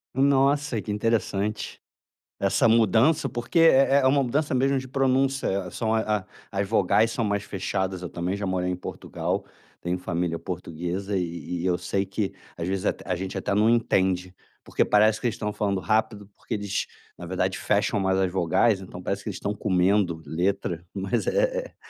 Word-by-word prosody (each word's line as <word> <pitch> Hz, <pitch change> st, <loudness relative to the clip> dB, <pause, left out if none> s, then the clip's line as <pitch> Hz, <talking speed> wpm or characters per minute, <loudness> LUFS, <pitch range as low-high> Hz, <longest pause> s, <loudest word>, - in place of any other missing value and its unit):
Nossa 140 Hz, -1 st, +3 dB
que 105 Hz, -, -5 dB
interessante, 105 Hz, -1 st, -1 dB, 0.6 s
essa 100 Hz, +3 st, +3 dB
mudança 115 Hz, -, +4 dB
porque 120 Hz, +8 st, -1 dB
é 140 Hz, -4 st, +6 dB
é 130 Hz, -, +3 dB
uma 140 Hz, +1 st, +3 dB
mudança 140 Hz, +3 st, 0 dB
mesmo 135 Hz, +1 st, +2 dB
de 130 Hz, -, -8 dB
pronúncia, 135 Hz, -7 st, +1 dB
são 110 Hz, +4 st, -1 dB
a 105 Hz, -3 st, 0 dB, 0.3 s
as 100 Hz, 0 st, -1 dB
vogais 110 Hz, +2 st, +3 dB
são 115 Hz, -, -1 dB
mais 100 Hz, -1 st, 0 dB
fechadas, 95 Hz, -1 st, -3 dB
eu 90 Hz, -, -5 dB
também 90 Hz, +3 st, -2 dB
já 100 Hz, -1 st, -3 dB
morei 90 Hz, -1 st, 0 dB
em -, -, -1 dB
Portugal, 90 Hz, -, -4 dB, 0.3 s
tenho 90 Hz, +1 st, -2 dB
família 85 Hz, -2 st, -2 dB
portuguesa 90 Hz, +3 st, -4 dB
e 85 Hz, -1 st, -3 dB
e 90 Hz, -, -3 dB
eu 90 Hz, -, +2 dB
sei 95 Hz, +1 st, -1 dB
que 100 Hz, 0 st, -3 dB, 0.2 s
às 85 Hz, 0 st, -3 dB
vezes 95 Hz, 0 st, -2 dB
até -, -, -3 dB
a 90 Hz, -, 0 dB
gente 95 Hz, +2 st, -5 dB
até 95 Hz, -, -1 dB
não 105 Hz, +2 st, +4 dB
entende. 95 Hz, -6 st, +1 dB, 0.3 s
Porque -, -, +1 dB
parece 110 Hz, +1 st, +4 dB
que -, -, 0 dB
eles 115 Hz, -, -2 dB
estão 105 Hz, 0 st, -3 dB
falando 100 Hz, -3 st, -1 dB
rápido 110 Hz, -1 st, 0 dB
porque -, -, -7 dB
eles, 100 Hz, -2 st, -2 dB, 0.3 s
na 85 Hz, -, -9 dB
verdade 95 Hz, +1 st, -1 dB
fecham 105 Hz, 0 st, +1 dB
mais 95 Hz, -1 st, +1 dB
as 95 Hz, -2 st, +1 dB
vogais, 95 Hz, +3 st, +2 dB
então 90 Hz, -1 st, -9 dB
parece 100 Hz, +2 st, -2 dB
que -, -, -4 dB
eles 100 Hz, -, -5 dB
estão 105 Hz, -, -2 dB
comendo 95 Hz, -3 st, +1 dB
letra, 85 Hz, -1 st, -1 dB
mas 100 Hz, +5 st, -1 dB
é -, -, 0 dB
100 Hz, 180 wpm, -25 LUFS, 95-115 Hz, 0.6 s, é